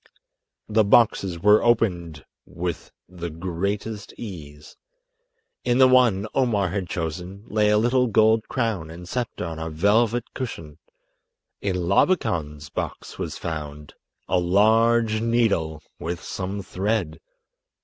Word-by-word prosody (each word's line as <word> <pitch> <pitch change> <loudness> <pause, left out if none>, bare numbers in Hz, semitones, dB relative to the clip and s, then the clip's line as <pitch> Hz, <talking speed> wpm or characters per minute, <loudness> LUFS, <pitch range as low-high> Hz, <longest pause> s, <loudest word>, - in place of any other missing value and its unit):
The 110 0 +3
boxes 100 -4 +3
were 105 +5 +5
opened 90 -10 0 0.2
with 85 -2 -5 0.2
the 85 -1 -6
greatest 100 +6 -4
ease. 75 -9 -9 0.9
In 120 0 +2
the 130 0 +7
one 120 -6 +4
Omar 110 -8 +1
had 95 -1 -3
chosen 90 +4 -5
lay 105 -1 +1
a 105 - +4
little 125 +3 +2
gold 110 0 +3
crown 110 -10 -2
and 85 +2 -10
sceptre 120 -3 -3
on 80 -1 -6
a 80 0 -4
velvet 105 +8 +2
cushion. 80 - -6 0.8
In 95 -2 -1
Labakan's 75 - +1
box - - -5
was - - -4
found—a 75 +3 -5
large 110 +4 +3
needle 100 -10 +1 0.2
with 85 +1 -4
some 100 +1 -4
thread! 95 -4 -2
100 Hz, 120 wpm, -24 LUFS, 85-115 Hz, 0.9 s, the